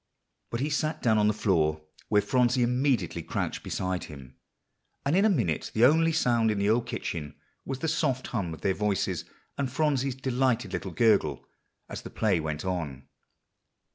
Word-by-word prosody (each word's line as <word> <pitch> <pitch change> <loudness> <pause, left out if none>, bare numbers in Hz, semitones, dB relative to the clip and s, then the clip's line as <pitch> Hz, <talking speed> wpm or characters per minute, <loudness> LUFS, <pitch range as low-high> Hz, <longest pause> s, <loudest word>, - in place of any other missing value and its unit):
But 115 - -3
he 150 +2 -1
sat 155 +2 -1
down 110 -3 +4
on 105 - +4
the - - +4
floor, 80 -7 +1 0.3
where 105 -1 +3
Phronsie 125 -1 +2
immediately 125 - +1
crouched 80 - -3
beside 95 -1 -3
him; 65 -4 -12 0.7
and 140 +4 +2
in 195 +3 +4
a - - +5
minute 115 - 0
the 115 +2 +6
only 165 +4 +4
sound 120 -8 +2
in 105 - 0
the 100 +1 +2
old 115 +1 +1
kitchen 75 -3 -4 0.3
was 135 - -3
the 160 - -3
soft 145 -5 0
hum 100 -8 -3
of 80 - -8
their 95 - +1
voices, 95 -4 -1 0.3
and 135 -3 -1
Phronsie's 140 -3 0
delighted 125 -5 0
little 95 +2 -3
gurgle 90 - +2 0.4
as - - -6
the - - -8
play 100 -6 +1
went 80 +1 -4
on. 80 -8 -4
110 Hz, 175 wpm, -28 LUFS, 90-130 Hz, 0.7 s, the